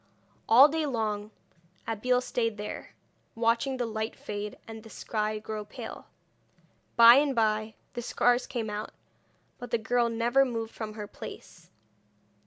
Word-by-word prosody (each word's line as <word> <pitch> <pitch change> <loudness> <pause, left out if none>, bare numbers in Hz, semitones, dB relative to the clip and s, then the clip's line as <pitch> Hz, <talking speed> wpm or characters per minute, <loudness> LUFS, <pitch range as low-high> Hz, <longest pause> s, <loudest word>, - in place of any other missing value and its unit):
All 255 +6 +9
day 310 0 -1
long 215 -5 -2 0.6
Abeille 250 +3 +1
stayed 230 -3 -1
there, 210 0 -7 0.4
watching 235 +4 +1
the 245 - -1
light 220 0 -3
fade, 205 0 -6
and 225 -1 -8
the 225 - -13
sky 215 -1 -2
grow 215 0 -5
pale. 205 - -9 0.9
By 235 +1 +9
and 280 -1 +2
by 215 -1 +1 0.2
the 240 - -4
stars 245 +1 +2
came 225 -4 -3
out, 210 +1 -5 0.7
but 245 -1 -7
the 235 - +2
girl 235 +1 +1
never 235 +4 +3
moved 230 -3 -3
from 215 -1 -6
her 210 -1 -5
place. 205 - -11
230 Hz, 145 wpm, -28 LUFS, 215-245 Hz, 0.9 s, All